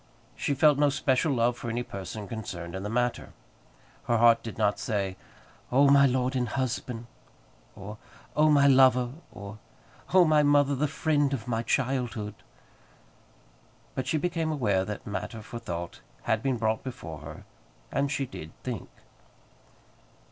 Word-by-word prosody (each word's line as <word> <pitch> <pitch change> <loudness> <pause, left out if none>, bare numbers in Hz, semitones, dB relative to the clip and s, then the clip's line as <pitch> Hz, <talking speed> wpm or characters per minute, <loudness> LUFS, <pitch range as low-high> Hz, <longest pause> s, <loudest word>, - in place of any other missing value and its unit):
She 140 - -1
felt 145 +1 +5
no 145 -1 +5
special 135 +1 +1
love 120 -2 +2
for 120 -1 -6
any 120 +2 -2
person 100 0 -7
concerned 90 -6 -6
in 95 - -4
the 105 - -4
matter. 120 +2 -1 0.7
Her 120 - +3
heart 115 0 +5
did 115 - -7
not 105 -2 +1
say, 100 -3 -2 0.6
"Oh, 140 +3 +5
my 140 0 +7
lord 130 +1 0
and 125 -2 0
husband!" 125 -2 -3 0.7
or, 105 +2 -9 0.4
"Oh, 155 +1 +5
my 145 -2 +5
lover!" 130 -2 +5 0.2
or, 100 +1 -9 0.5
"Oh, 185 -1 +6
my 155 -1 +4
mother, 145 -1 +4
the 145 +3 +1
friend 145 +1 +1
of 120 -2 -8
my 115 -2 0
childhood!" 120 -5 -1 1.6
But 130 0 -3
she 160 - +1
became 165 0 -1
aware 105 -10 +1
that 105 +1 -6
matter 105 +2 -5
for 120 +2 -7
thought 85 -6 -6 0.2
had 110 -1 +1
been 130 -1 0
brought 110 -1 0
before 85 - -7
her, 75 - -10 0.5
and 140 +1 0
she 140 -3 -1
did 80 -10 -9
think. 120 -8 -5
125 Hz, 155 wpm, -28 LUFS, 110-140 Hz, 1.6 s, my